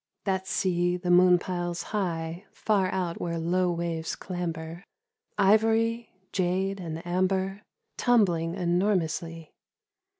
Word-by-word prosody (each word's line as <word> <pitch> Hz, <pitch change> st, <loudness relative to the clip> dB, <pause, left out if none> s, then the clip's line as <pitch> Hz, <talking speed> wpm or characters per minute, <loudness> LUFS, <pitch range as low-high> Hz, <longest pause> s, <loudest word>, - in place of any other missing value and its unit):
That 190 Hz, -2 st, -1 dB
sea 175 Hz, -1 st, +1 dB
the 180 Hz, 0 st, -1 dB
moon 180 Hz, 0 st, +7 dB
piles 175 Hz, -1 st, -3 dB
high 170 Hz, -2 st, -2 dB
far 200 Hz, -4 st, +1 dB
out 180 Hz, -3 st, -2 dB
where 170 Hz, -1 st, -2 dB
low 175 Hz, +2 st, +1 dB
waves 170 Hz, -1 st, -3 dB
clamber, 170 Hz, -1 st, -5 dB, 0.5 s
Ivory, 225 Hz, +3 st, +3 dB, 0.2 s
jade, 190 Hz, +1 st, 0 dB
and 165 Hz, -2 st, -6 dB
amber, 190 Hz, +2 st, 0 dB, 0.4 s
tumbling 175 Hz, -9 st, +2 dB
enormously. 170 Hz, -3 st, -1 dB
180 Hz, 105 wpm, -27 LUFS, 170-195 Hz, 0.5 s, moon